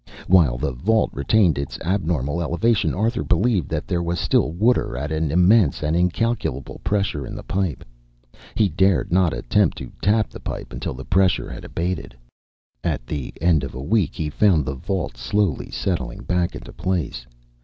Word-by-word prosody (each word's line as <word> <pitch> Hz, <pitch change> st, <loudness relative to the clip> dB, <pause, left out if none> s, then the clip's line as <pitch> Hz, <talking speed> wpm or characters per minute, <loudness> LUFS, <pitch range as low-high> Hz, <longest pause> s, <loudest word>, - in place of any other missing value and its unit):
While 80 Hz, -10 st, +4 dB
the 70 Hz, -, -1 dB
vault 105 Hz, -, +1 dB
retained 85 Hz, +3 st, +2 dB
its 70 Hz, -, -4 dB
abnormal 85 Hz, -4 st, -1 dB
elevation, 105 Hz, +7 st, +1 dB
Arthur 115 Hz, +5 st, 0 dB
believed 95 Hz, -, +1 dB
that 80 Hz, -1 st, -2 dB
there 90 Hz, -2 st, 0 dB
was 85 Hz, 0 st, -2 dB
still 70 Hz, -, +2 dB
water 105 Hz, -, +1 dB
at 75 Hz, +3 st, -3 dB
an 80 Hz, -1 st, 0 dB
immense 90 Hz, 0 st, +4 dB
and 75 Hz, +2 st, +1 dB
incalculable 90 Hz, -, -1 dB
pressure 100 Hz, -8 st, 0 dB
in -, -, -7 dB
the -, -, -7 dB
pipe. 95 Hz, -7 st, -2 dB, 0.7 s
He 105 Hz, -, +3 dB
dared 95 Hz, +1 st, +2 dB
not 90 Hz, -1 st, +3 dB
attempt -, -, +1 dB
to -, -, -7 dB
tap 105 Hz, +1 st, +2 dB
the -, -, -9 dB
pipe -, -, -6 dB
until -, -, -4 dB
the 65 Hz, -, -8 dB
pressure 95 Hz, 0 st, +2 dB
had -, -, -8 dB
abated. 85 Hz, -7 st, -4 dB, 0.7 s
At -, -, -2 dB
the 70 Hz, -2 st, -4 dB
end 80 Hz, -4 st, +3 dB
of 70 Hz, -, -6 dB
a 65 Hz, -, -5 dB
week 95 Hz, -1 st, +1 dB
he 75 Hz, -1 st, -3 dB
found 85 Hz, -6 st, +3 dB
the 65 Hz, -, -2 dB
vault 85 Hz, -2 st, -3 dB
slowly 90 Hz, +6 st, 0 dB
settling 85 Hz, -9 st, -3 dB
back 90 Hz, -1 st, 0 dB
into -, -, -9 dB
place. 80 Hz, -10 st, -2 dB
85 Hz, 175 wpm, -22 LUFS, 70-95 Hz, 0.7 s, While